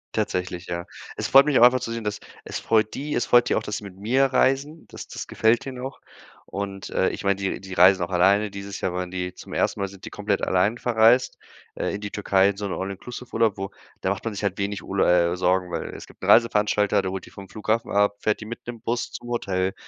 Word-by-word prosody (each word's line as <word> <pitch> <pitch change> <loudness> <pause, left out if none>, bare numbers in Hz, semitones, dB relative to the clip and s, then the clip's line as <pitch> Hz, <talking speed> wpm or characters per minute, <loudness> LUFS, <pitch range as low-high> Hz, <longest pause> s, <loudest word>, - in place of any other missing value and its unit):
Tatsächlich, 90 0 -2
ja. 85 0 -4 0.3
Es - - -3
freut 135 +1 +7
mich 145 - +3
auch - - +6
einfach 125 +1 +7
zu 115 -2 -5
sehen, 115 -1 -4
dass 105 -1 -3 0.3
es - - -4
freut 110 -1 +1
die, 145 +2 -3
es - - +1
freut 120 0 +4
die - - +2
auch, 110 - 0
dass 105 - -3
sie - - -9
mit 95 -2 -10
mir 125 +7 +2
reisen. 135 +4 +1
Das - - -10
das - - -6
gefällt 110 +1 +2
denen 130 -2 -6
auch. 135 - -7 0.4
Und, 100 0 -6
äh, 95 - +2
ich - - -6
meine, 100 0 +2
die 95 -1 -2
die 95 -1 -9
reisen 95 +1 +6
auch 85 - -5
alleine. 100 +4 +3
Dieses 100 0 -7
Jahr 90 - -2
waren 90 0 -3
die 90 0 -4
zum - - -11
1. - - 0
Mal 100 - -1
sind 95 0 -13
die - - -8
komplett 105 -1 -1
allein 95 +5 +2
verreist, 120 +2 +3 0.3
äh, - - -2
in 105 - -6
die 105 -1 -5
Türkei, 100 -1 +3
in 100 - -4
so 105 - -4
'n - - -5
All-Inclusive-Urlaub, 115 +2 -2
wo 95 +1 -5 0.3
da 95 - 0
macht 100 - -4
man 115 -3 -3
sich 105 - -5
halt 100 0 -1
wenig 100 0 -2
Ul 100 0 -2
äh, 85 0 +3
Sorgen, 90 0 +1
weil 85 - -3
es - - -9
gibt - - -20
'n - - -4
Reiseveranstalter, 105 -3 +4
der 95 - -3
holt 95 -1 -5
die - - -15
vom 100 -1 -11
Flughafen 110 +1 -1
ab, 100 0 +2
fährt 105 - 0
die 105 - -8
mit 115 +1 -9
'nem 120 -2 -7
Bus, 120 +1 -2
zum 120 - -8
Hotel. 95 -5 -1
100 Hz, 255 wpm, -24 LUFS, 95-115 Hz, 0.4 s, freut